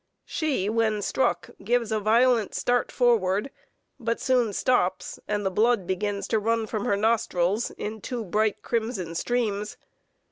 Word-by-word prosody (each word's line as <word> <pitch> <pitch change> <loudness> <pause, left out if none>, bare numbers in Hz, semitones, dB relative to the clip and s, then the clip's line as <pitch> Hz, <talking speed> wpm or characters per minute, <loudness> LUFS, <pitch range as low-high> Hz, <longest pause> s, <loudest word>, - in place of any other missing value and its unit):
She, 285 - -1
when 215 -1 +1
struck, 175 -9 0
gives 235 +1 +1
a 215 - +1
violent 230 +1 +3
start 245 0 +1
forward, 225 -1 +2 0.5
but 230 -1 -1
soon 250 -4 +2
stops, 190 -5 0
and 205 -1 -1
the 190 - +1
blood 220 0 +2
begins 200 +2 -2
to 220 - +2
run 225 +1 0
from 215 -1 -3
her 200 - +1
nostrils 215 -2 +1
in 215 0 -6
two 240 0 -4
bright 210 +3 0
crimson 220 -7 -2
streams. 210 +1 -1
220 Hz, 145 wpm, -26 LUFS, 200-235 Hz, 0.5 s, violent